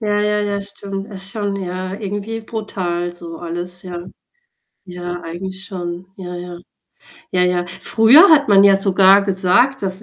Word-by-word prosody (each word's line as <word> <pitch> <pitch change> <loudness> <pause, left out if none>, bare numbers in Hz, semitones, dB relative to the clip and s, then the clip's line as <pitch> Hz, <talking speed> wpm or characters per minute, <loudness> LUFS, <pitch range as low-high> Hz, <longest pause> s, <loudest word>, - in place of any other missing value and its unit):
Ja, 210 -1 0
ja, 210 0 0
ja, 205 -1 -2
stimmt. 200 0 -8
Ist 195 0 0
schon 205 -2 -3
ja, 185 +1 -5
irgendwie 205 +2 -5
brutal 185 -6 -4
so 170 -1 -10
alles, 175 +1 -5
ja. 175 -1 -7 0.8
Ja, 175 -1 -7
eigentlich 190 +3 -6
schon. 175 -2 -6
Ja, 180 -2 -8
ja. 175 0 -8 0.8
Ja, 180 - +2
ja. 180 -1 0
Früher 225 - +5
hat 295 -3 +5
man 200 -1 +6
ja 195 -1 +6
sogar 195 0 +5
gesagt, 200 +7 +2
dass 190 +2 -2
190 Hz, 155 wpm, -18 LUFS, 180-205 Hz, 0.8 s, man